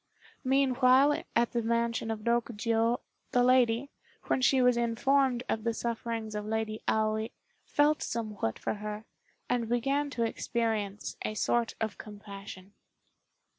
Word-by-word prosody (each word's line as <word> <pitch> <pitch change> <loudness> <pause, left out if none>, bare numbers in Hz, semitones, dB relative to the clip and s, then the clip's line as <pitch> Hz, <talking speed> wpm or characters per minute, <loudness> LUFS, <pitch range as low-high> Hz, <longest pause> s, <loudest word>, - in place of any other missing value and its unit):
Meanwhile 265 +1 +4
at 235 - +3
the 240 - 0
mansion 230 0 0
of 220 -1 -3
Rokjiô, 230 0 +1 0.3
the 245 - +4
lady, 250 +1 +3 0.3
when - - 0
she 265 +1 +4
was 250 -1 +5
informed 245 +2 +2
of 220 - -1
the 230 -1 0
sufferings 230 -2 -3
of 210 0 -3
Lady 220 0 -2
Aoi, 220 0 +1 0.4
felt 295 +1 +2
somewhat 215 - -3
for - - -2
her, 210 +1 -6 0.4
and 235 -2 0
began 275 +5 +1
to 240 -4 -2
experience 220 -3 -2
a 215 - -3
sort 235 +2 +1
of 220 -1 -3
compassion. 200 -2 -10
230 Hz, 135 wpm, -30 LUFS, 215-250 Hz, 0.4 s, was